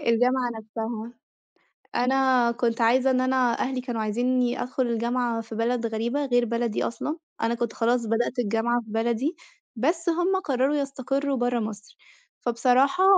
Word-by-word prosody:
الجامعة 245 Hz, +2 st, +2 dB
نفسها. 225 Hz, +1 st, -5 dB, 0.8 s
أنا 255 Hz, -1 st, +3 dB
كنت 235 Hz, -1 st, -1 dB
عايزة 255 Hz, +3 st, +4 dB
إن 255 Hz, 0 st, +2 dB
أنا 255 Hz, -2 st, +2 dB
أهلي 260 Hz, 0 st, -1 dB
كانوا 240 Hz, -3 st, -3 dB
عايزينّي 245 Hz, +3 st, 0 dB
أدخل 255 Hz, 0 st, -1 dB
الجامعة 235 Hz, 0 st, 0 dB
في 225 Hz, 0 st, -9 dB
بلد 235 Hz, +1 st, 0 dB
غريبة 235 Hz, +6 st, -1 dB
غير 245 Hz, -2 st, +2 dB
بلدي 235 Hz, -1 st, -1 dB
أصلًا، 300 Hz, +7 st, -3 dB, 0.2 s
أنا 230 Hz, +1 st, +1 dB
كنت 235 Hz, -1 st, -2 dB
خلاص 235 Hz, +1 st, +1 dB
بدأت 235 Hz, +3 st, 0 dB
الجامعة 240 Hz, +2 st, +1 dB
في 220 Hz, -, -13 dB
بلدي، 235 Hz, +8 st, 0 dB, 0.4 s
بس 330 Hz, +8 st, 0 dB
هُم 350 Hz, +3 st, +1 dB
قرروا 270 Hz, +1 st, +1 dB
يستقروا 275 Hz, 0 st, -1 dB
برّه 245 Hz, 0 st, +1 dB
مصر، 215 Hz, -1 st, -6 dB, 0.4 s
فبصراحة، 255 Hz, +8 st, +3 dB
245 Hz, 145 wpm, -25 LUFS, 230-260 Hz, 0.8 s, عايزة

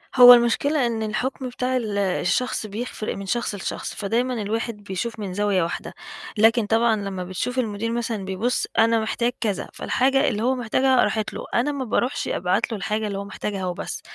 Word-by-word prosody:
هو 245 Hz, -1 st, +11 dB
المشكلة 245 Hz, +4 st, +3 dB
إن 225 Hz, -2 st, -1 dB
الحُكم 255 Hz, +4 st, -3 dB
بتاع 255 Hz, +1 st, -1 dB
ال 215 Hz, -4 st, -2 dB
الشخص 200 Hz, +5 st, 0 dB
بيفرق 215 Hz, +1 st, -4 dB
من 195 Hz, -, -6 dB
شخص 230 Hz, +1 st, -1 dB
لشخص، 195 Hz, -, -4 dB
فدايمًا 235 Hz, +5 st, 0 dB
الواحد 215 Hz, +1 st, -3 dB
بيشوف 205 Hz, +4 st, -4 dB
من 195 Hz, -3 st, -4 dB
زاوية 200 Hz, -2 st, +1 dB
واحدة. 170 Hz, -, -4 dB, 0.4 s
لكن 225 Hz, +1 st, +4 dB
طبعًا 225 Hz, +1 st, +3 dB
لما 195 Hz, -3 st, -4 dB
بتشوف 185 Hz, +8 st, -3 dB
المدير 225 Hz, -1 st, -2 dB
مثلًا 230 Hz, -4 st, -2 dB
بيبُص 195 Hz, +6 st, -1 dB
أنا 230 Hz, 0 st, +4 dB
محتاج 235 Hz, +2 st, 0 dB
كذا، 205 Hz, -5 st, -1 dB
فالحاجة 270 Hz, +1 st, +1 dB
اللي 215 Hz, +1 st, -1 dB
هو 260 Hz, +2 st, +2 dB
محتاجها 255 Hz, +2 st, +2 dB
راحت 215 Hz, -1 st, -1 dB
له، -, -, -6 dB
أنا 250 Hz, +5 st, +2 dB
ما 275 Hz, -2 st, -3 dB
باروحش 240 Hz, +3 st, -1 dB
أبعت 185 Hz, +6 st, 0 dB
له 220 Hz, -, -2 dB
الحاجة 215 Hz, +3 st, -2 dB
اللي 200 Hz, -1 st, -3 dB
هو 200 Hz, -, -4 dB
محتاجها 200 Hz, -1 st, -4 dB
وبس، 180 Hz, -1 st, -4 dB
225 Hz, 180 wpm, -23 LUFS, 200-245 Hz, 0.4 s, هو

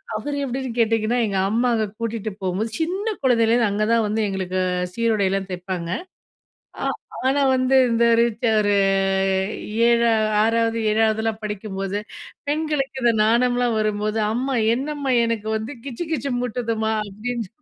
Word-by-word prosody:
அவரு 285 Hz, +7 st, -3 dB
எப்டின்னு 260 Hz, +1 st, -3 dB
கேட்டீங்கன்னா, 225 Hz, +1 st, +2 dB
எங்க 195 Hz, -, -2 dB
அம்மா 240 Hz, +3 st, +2 dB
அங்க 220 Hz, -1 st, 0 dB
கூட்டிட்டுப் 220 Hz, -3 st, -4 dB
போகும்போது, 190 Hz, +4 st, -1 dB
சின்னக் 390 Hz, +5 st, -2 dB
குழந்தைலருந்து 235 Hz, -2 st, +3 dB
அங்கதான் 215 Hz, +2 st, +2 dB
வந்து, 215 Hz, +2 st, -1 dB
எங்களுக்கு 185 Hz, -1 st, -2 dB, 0.4 s
சீருடைலாம் 200 Hz, -4 st, 0 dB
தைப்பாங்க 180 Hz, -1 st, -4 dB, 0.9 s
ஆ -, -, -1 dB, 0.4 s
ஆனா 280 Hz, +2 st, +2 dB, 0.2 s
வந்து, 255 Hz, +1 st, +2 dB
இந்த 230 Hz, 0 st, +3 dB, 0.6 s
ஒரு 205 Hz, -1 st, +2 dB, 1.1 s
ஏழா 235 Hz, -1 st, +4 dB, 0.3 s
6வது, 230 Hz, +1 st, +1 dB
7வதுலாம் 220 Hz, 0 st, +1 dB
படிக்கும்போது, 200 Hz, -1 st, -4 dB, 0.5 s
பெண்களுக்கு 295 Hz, -3 st, -1 dB
இந்த 235 Hz, -, +4 dB
நாணம்லாம் 245 Hz, +1 st, +2 dB
வரும்போது, 215 Hz, 0 st, -1 dB
அம்மா 260 Hz, +3 st, -1 dB, 0.2 s
என்னம்மா, 280 Hz, +1 st, -2 dB
எனக்கு 225 Hz, -2 st, -2 dB
வந்து, 220 Hz, +6 st, -5 dB
கிச்சு 280 Hz, +5 st, -5 dB
கிச்சு 275 Hz, -3 st, -2 dB
மூட்டுதம்மா? 230 Hz, -2 st, -1 dB, 0.2 s
அப்டின்னு. 225 Hz, +2 st, -4 dB
230 Hz, 125 wpm, -22 LUFS, 215-250 Hz, 1.1 s, ஏழா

